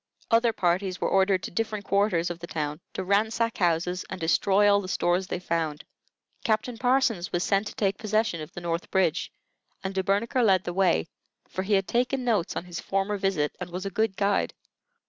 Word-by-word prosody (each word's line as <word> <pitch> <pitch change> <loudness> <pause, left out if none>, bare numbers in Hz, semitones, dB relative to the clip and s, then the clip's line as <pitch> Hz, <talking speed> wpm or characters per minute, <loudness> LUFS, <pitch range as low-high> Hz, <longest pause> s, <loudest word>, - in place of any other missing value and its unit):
Other 230 +1 +4
parties 185 -1 0
were - - 0
ordered 190 -1 +3
to - - -5
different 215 0 -2
quarters 195 -4 +1
of 175 - -7
the 170 - -8
town 150 -2 -3
to 190 - -3
ransack 220 +4 +1
houses 175 0 +1
and 185 - -5
destroy 195 +5 +3
all 200 0 +5
the 185 - -7
stores 185 0 +1
they 180 - -2
found. 165 -4 -2 0.6
Captain 225 +1 0
Parsons 245 -8 +2
was 175 +1 0
sent 200 +1 +1
to - - -8
take 195 -2 0
possession 215 -5 0
of 155 +2 -8
the 175 - -7
North 170 0 -3
Bridge, 175 -3 +1 0.5
and 190 0 -3
De 190 - +1
Bernicre 205 +6 +1
led 190 -4 +4
the 175 - -4
way, 180 - +2 0.4
for 185 - -4
he 200 +2 -1
had 195 -1 +2
taken 250 +2 0
notes 210 -7 +1
on - - -3
his 175 -2 -6
former 195 +1 -1
visit, 190 -7 0
and 180 -1 -5
was 180 +2 -5
a 195 - -3
good 220 0 0
guide. 200 0 +1
190 Hz, 205 wpm, -27 LUFS, 175-210 Hz, 0.6 s, all